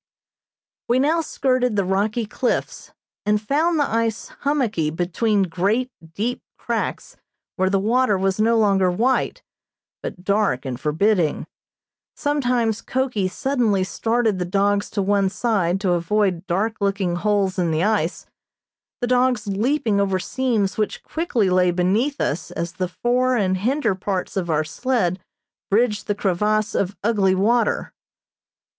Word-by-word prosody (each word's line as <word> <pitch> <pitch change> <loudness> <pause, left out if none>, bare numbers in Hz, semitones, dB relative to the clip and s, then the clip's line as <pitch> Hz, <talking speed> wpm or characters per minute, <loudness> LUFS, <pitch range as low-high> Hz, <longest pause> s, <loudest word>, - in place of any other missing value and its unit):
We 240 - +3
now 310 +5 +2
skirted 255 -6 0
the 200 -2 +1
rocky 205 +5 0
cliffs, 240 +4 -2 0.3
and 210 +1 +2
found 305 +9 +1
the 290 - +2
ice 225 -1 -1
hummocky 245 - 0
between 190 +6 0
great, 200 +9 0 0.2
deep 235 +5 -2 0.2
cracks - - -3 0.4
where 190 -1 +1
the 195 - +2
water 220 +1 +2
was 190 +1 0
no 230 +2 +3
longer 195 -4 +3
white, 235 +9 0 0.6
but 180 - -7
dark 200 -10 +1
and 125 -2 -4
forbidding. 165 +3 +1 0.7
Sometimes 245 -7 0
Koki 255 -7 -1
suddenly 230 -3 0
started 225 +1 0
the - - 0
dogs 200 +2 +1
to 200 - -1
one 200 0 +2
side 195 -4 0
to 190 -3 +1
avoid 180 +1 0
dark 210 +5 0
looking 195 -3 0
holes 195 0 0
in 175 -2 +1
the 160 +1 0
ice, 205 -6 0 0.8
the 245 - 0
dogs 250 -3 +2
leaping 215 +1 +1
over 195 -1 +1
seams 220 -2 -1
which 215 - -2
quickly 285 - 0
lay 180 -1 +3
beneath 200 +11 +1
us 155 - -2
as 170 0 -4
the 185 0 -2
fore 250 +6 +1
and 190 -3 +1
hinder 235 +2 +1
parts 190 0 -3
of 180 -3 -2
our 155 -1 +2
sled 185 +1 -1 0.5
bridged 210 0 +1
the 205 - 0
crevasse 210 +2 0
of 200 +1 -1
ugly 200 -4 +2
water. 230 +5 +1
205 Hz, 140 wpm, -22 LUFS, 185-240 Hz, 0.8 s, We